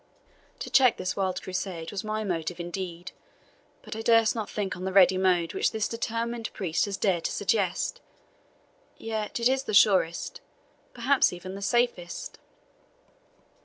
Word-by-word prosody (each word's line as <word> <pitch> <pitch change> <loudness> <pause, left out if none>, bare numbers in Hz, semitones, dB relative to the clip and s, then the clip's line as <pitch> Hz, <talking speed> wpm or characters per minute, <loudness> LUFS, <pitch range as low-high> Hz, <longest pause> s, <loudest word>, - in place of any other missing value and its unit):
To - - -7
check 255 -3 +5
this 185 0 -3
wild 185 -2 -1
Crusade 185 -3 -4
was 205 +1 -4
my 215 0 -2
motive, 175 -3 -3
indeed, 175 0 -5 0.7
but - - -7
I 220 - -4
durst 230 -1 +4
not 220 -3 -4
think 200 -2 -3
on 180 - -8
the 190 - -2
ready 185 -1 +6
mode 180 -3 +2
which - - +1
this 220 -1 -1
determined 230 0 -3
priest 175 -2 0
has 200 -1 -4
dared 180 -5 +1
to - - 0
suggest. 205 - 0 1.0
Yet 220 0 -4
it 235 - +4
is 265 +1 +2
the 215 - -1
surest 185 -5 +3 0.5
perhaps 260 +3 +3
even 180 +1 -8
the 200 - -7
safest." 240 -5 -1
195 Hz, 155 wpm, -27 LUFS, 180-225 Hz, 1.0 s, ready